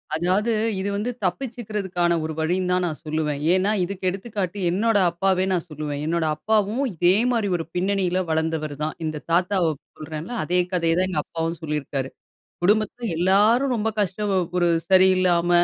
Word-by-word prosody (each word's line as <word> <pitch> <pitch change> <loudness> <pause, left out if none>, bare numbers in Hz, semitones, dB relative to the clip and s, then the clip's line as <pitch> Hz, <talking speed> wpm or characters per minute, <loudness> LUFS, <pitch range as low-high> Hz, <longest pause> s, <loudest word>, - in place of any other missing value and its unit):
அதாவது 185 +7 +1 0.3
இது 195 +1 -2
வந்து 215 +5 -1
தப்பிச்சுக்கறதுக்கான 195 -6 -1
ஒரு 160 0 -3
வழின்னு 180 +3 0
தான் 180 0 +2
நான் 160 -3 -4
சொல்லுவேன். 150 -2 -1
ஏன்னா 190 +3 +2
இதுக்கு 190 +1 -5
எடுத்துக்காட்டு 195 -1 -4
என்னோட 215 +4 +2
அப்பாவே 185 +2 +1
நான் 175 -2 -1
சொல்லுவேன் 150 -1 -4
என்னோட 165 +1 0
அப்பாவும் 215 - 0
இதே 175 +3 +4 0.2
மாரி 225 -4 +1
ஒரு 165 - -5
பின்னணியில 185 0 +1
வளந்தவரு 160 -2 -1
தான். 155 - -2
இந்த 155 -1 -4
தாத்தாவ 180 -1 +2 0.3
சொல்றேன்ல! 155 +7 -6
அதே 180 +3 +1
கதைய 165 -2 +2
தான் 185 - +2
எங்க 185 - -1
அப்பாவும் 165 0 -3
சொல்லிருக்காரு. 145 -4 -3 0.5
குடும்பத்துல 215 +4 +1
எல்லாரும் 210 +9 +3
ரொம்ப 225 0 0
கஷ்டம் 200 +1 -1 0.3
ஒரு 175 -1 +3 0.2
சரியில்லாம 185 -2 +4
180 Hz, 150 wpm, -23 LUFS, 160-200 Hz, 0.5 s, இதே